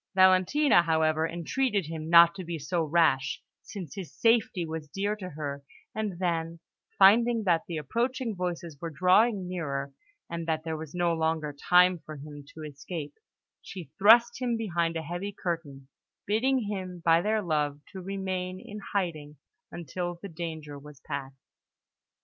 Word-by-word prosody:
Valentina, 185 Hz, +6 st, +5 dB
however, 160 Hz, -1 st, +1 dB
entreated 200 Hz, +5 st, -1 dB
him 160 Hz, 0 st, -6 dB
not 170 Hz, 0 st, +8 dB
to 185 Hz, -, -7 dB
be 170 Hz, -1 st, -4 dB
so 165 Hz, +4 st, -2 dB
rash, 155 Hz, -4 st, +2 dB, 0.2 s
since 190 Hz, -6 st, -8 dB
his 190 Hz, -5 st, -7 dB
safety 225 Hz, -6 st, +2 dB
was 160 Hz, -1 st, -6 dB
dear 200 Hz, +7 st, -2 dB
to 190 Hz, -3 st, -7 dB
her; 145 Hz, -3 st, -5 dB, 0.3 s
and 210 Hz, -4 st, -3 dB
then, 170 Hz, -2 st, -2 dB, 0.4 s
finding 225 Hz, +4 st, +5 dB
that 170 Hz, -4 st, +3 dB
the 170 Hz, -, -4 dB
approaching 235 Hz, -, -2 dB
voices 175 Hz, -4 st, -4 dB
were 165 Hz, -, -3 dB
drawing 185 Hz, +5 st, +3 dB
nearer, 140 Hz, -6 st, -4 dB, 0.3 s
and 170 Hz, -1 st, -5 dB
that 160 Hz, -1 st, -1 dB
there 160 Hz, -1 st, -3 dB
was 155 Hz, 0 st, -8 dB
no 175 Hz, -1 st, +1 dB
longer 160 Hz, -2 st, -1 dB
time 180 Hz, +4 st, +4 dB
for 155 Hz, -, -8 dB
him 145 Hz, 0 st, -10 dB
to 160 Hz, -, -10 dB
escape, 150 Hz, +1 st, -7 dB, 0.5 s
she 175 Hz, -8 st, -9 dB
thrust 235 Hz, +5 st, +6 dB
him 240 Hz, -2 st, 0 dB
behind 170 Hz, -6 st, -1 dB
a 160 Hz, -, -4 dB
heavy 175 Hz, +6 st, -4 dB
curtain, 160 Hz, -8 st, -5 dB, 0.4 s
bidding 250 Hz, +5 st, +1 dB
him, 190 Hz, -4 st, -5 dB
by 165 Hz, 0 st, +5 dB
their 215 Hz, +2 st, 0 dB
love, 150 Hz, -4 st, -1 dB
to 190 Hz, -, -7 dB
remain 185 Hz, -1 st, -4 dB
in 210 Hz, +2 st, -9 dB
hiding 155 Hz, -7 st, -2 dB, 0.3 s
until 175 Hz, +1 st, -4 dB
the 200 Hz, -, -8 dB
danger 160 Hz, -3 st, -6 dB
was 150 Hz, -1 st, -13 dB
past. 135 Hz, -2 st, -6 dB
170 Hz, 155 wpm, -28 LUFS, 155-195 Hz, 0.5 s, not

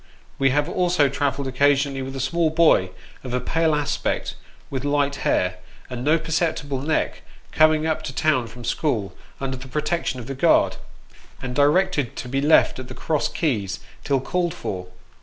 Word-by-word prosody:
We 135 Hz, -1 st, +4 dB
have 145 Hz, +3 st, +1 dB
also 175 Hz, -5 st, +2 dB
travelled 140 Hz, 0 st, -1 dB
occasionally, 140 Hz, +1 st, +2 dB
with 135 Hz, +1 st, -6 dB
a -, -, -4 dB
small 160 Hz, +5 st, +1 dB
boy 155 Hz, -, +4 dB, 0.3 s
of 125 Hz, -1 st, -3 dB
a -, -, +1 dB
pale 160 Hz, +4 st, +1 dB
aspect, 145 Hz, -1 st, -1 dB, 0.4 s
with 135 Hz, -1 st, -3 dB
light 145 Hz, -1 st, +1 dB
hair, 90 Hz, 0 st, 0 dB, 0.3 s
and 125 Hz, -1 st, -4 dB
no 155 Hz, +4 st, +4 dB
perceptible 160 Hz, -4 st, -1 dB
neck, 155 Hz, +3 st, -1 dB, 0.3 s
coming 155 Hz, 0 st, +4 dB
up 160 Hz, -1 st, 0 dB
to 140 Hz, -, -4 dB
town 135 Hz, -3 st, +1 dB
from 120 Hz, +1 st, -11 dB
school 110 Hz, -, -1 dB, 0.2 s
under 130 Hz, -1 st, -3 dB
the 130 Hz, +1 st, -10 dB
pro 150 Hz, +4 st, -2 dB
tection 170 Hz, -3 st, -1 dB
of 125 Hz, -2 st, -7 dB
the 135 Hz, -, -5 dB
guard, 130 Hz, -, +3 dB, 0.6 s
and 125 Hz, -1 st, -5 dB
directed 145 Hz, -1 st, +2 dB
to -, -, -6 dB
be 135 Hz, +2 st, -1 dB
left 150 Hz, -2 st, +4 dB
at 130 Hz, -, -7 dB
the -, -, -9 dB
Cross 155 Hz, -3 st, 0 dB
Keys 110 Hz, -, -1 dB, 0.2 s
till 140 Hz, -2 st, +1 dB
called 175 Hz, +5 st, -1 dB
for. 90 Hz, -2 st, -5 dB
140 Hz, 175 wpm, -23 LUFS, 130-155 Hz, 0.6 s, We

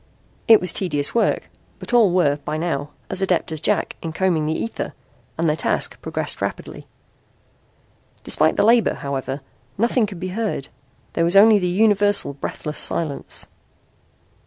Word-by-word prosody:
It 225 Hz, -1 st, +8 dB
was 180 Hz, -, +4 dB
tedious 150 Hz, -7 st, 0 dB
work, 235 Hz, -, +1 dB, 0.3 s
but -, -, -7 dB
all 225 Hz, -6 st, +5 dB
were 150 Hz, -6 st, +2 dB
by 150 Hz, +1 st, -5 dB
now 150 Hz, -3 st, -2 dB, 0.2 s
as 190 Hz, 0 st, -1 dB
adept 185 Hz, -4 st, 0 dB
as 155 Hz, -2 st, -2 dB
Jack -, -, 0 dB
in 165 Hz, -1 st, -5 dB
combing 165 Hz, -4 st, 0 dB
the 155 Hz, -, -1 dB
ether 230 Hz, -, -5 dB, 0.4 s
and 165 Hz, -, 0 dB
their 150 Hz, -, +2 dB
task -, -, -2 dB
progressed -, -, -4 dB
rapidly. -, -, -5 dB, 1.4 s
Despite 155 Hz, +1 st, +2 dB
the -, -, +3 dB
labor, 230 Hz, +1 st, +4 dB
however, 135 Hz, 0 st, -4 dB, 0.4 s
nothing 235 Hz, 0 st, +1 dB
could 190 Hz, -4 st, -9 dB
be 185 Hz, +1 st, -4 dB
heard. 200 Hz, -8 st, -3 dB, 0.4 s
There -, -, +1 dB
was 170 Hz, +3 st, +1 dB
only 210 Hz, +1 st, +7 dB
the 180 Hz, -, -1 dB
universal, 205 Hz, -3 st, +2 dB
breathless 150 Hz, +2 st, -5 dB
silence. 155 Hz, -4 st, -1 dB
175 Hz, 155 wpm, -21 LUFS, 150-205 Hz, 1.4 s, It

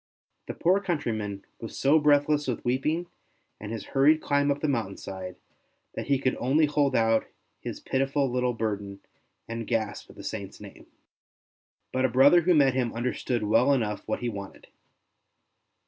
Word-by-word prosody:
The -, -, -5 dB
poor 185 Hz, +4 st, +3 dB
country 170 Hz, -11 st, -2 dB
man 105 Hz, -2 st, -5 dB
was 115 Hz, -, -8 dB
so 145 Hz, +4 st, +4 dB
breathless 150 Hz, 0 st, +3 dB
with 125 Hz, -1 st, -3 dB
weeping 150 Hz, +8 st, 0 dB, 0.5 s
and 105 Hz, +1 st, -7 dB
his 115 Hz, -2 st, -5 dB
hurried 145 Hz, +3 st, +5 dB
climb 145 Hz, -1 st, +1 dB
up 140 Hz, 0 st, 0 dB
the 155 Hz, -, -1 dB
mountain 115 Hz, -8 st, -2 dB
side, 95 Hz, -1 st, -7 dB, 0.6 s
that -, -, -5 dB
he 140 Hz, -, +3 dB
could 130 Hz, -1 st, 0 dB
only 145 Hz, +6 st, +3 dB
hold 145 Hz, -1 st, +1 dB
out 115 Hz, 0 st, +2 dB, 0.3 s
his -, -, -6 dB
pitiful 135 Hz, +1 st, 0 dB
little 125 Hz, 0 st, 0 dB
burden 100 Hz, -3 st, -4 dB, 0.5 s
and 115 Hz, -1 st, -5 dB
gasp 110 Hz, -3 st, -2 dB
the -, -, -12 dB
Saint's -, -, -6 dB
name. -, -, -13 dB, 1.0 s
But 130 Hz, 0 st, +1 dB
a -, -, +2 dB
brother 140 Hz, +8 st, +6 dB
who 175 Hz, +1 st, +3 dB
met 140 Hz, -3 st, +4 dB
him 125 Hz, -3 st, 0 dB
understood 120 Hz, -1 st, -2 dB
well 115 Hz, +6 st, +3 dB
enough 110 Hz, -6 st, -1 dB
what -, -, -2 dB
he 120 Hz, -, -2 dB
wanted. 100 Hz, -3 st, -9 dB
130 Hz, 165 wpm, -27 LUFS, 110-145 Hz, 1.0 s, brother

